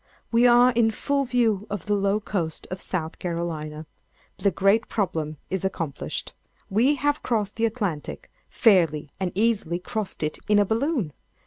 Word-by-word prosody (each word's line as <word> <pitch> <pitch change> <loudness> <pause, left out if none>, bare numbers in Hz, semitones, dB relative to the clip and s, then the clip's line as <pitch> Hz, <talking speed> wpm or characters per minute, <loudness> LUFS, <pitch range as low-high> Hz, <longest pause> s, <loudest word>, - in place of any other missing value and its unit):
We 235 +1 +5
are 245 +1 +6
in 230 -2 +3
full 280 +5 0
view 230 -5 +1
of 200 -4 -4
the 210 - 0
low 200 +1 +2
coast 175 -7 -3
of 185 - -4
South 165 -3 -3
Carolina_. 160 -3 -4 0.5
The 200 - +3
great 200 +4 +2
problem 160 -7 -2
is 190 -1 -1
accomplished. 165 -7 -3 0.4
We 245 +9 +4
have 290 +2 0
crossed 215 -4 -1
the 230 0 +3
Atlantic—fairly 175 - 0
and 185 -2 -1
easily 205 -5 +1
crossed 195 0 -4
it 155 - -2
in 210 -1 +4
a 205 - +5
balloon! 225 - 0
200 Hz, 150 wpm, -25 LUFS, 170-230 Hz, 0.5 s, are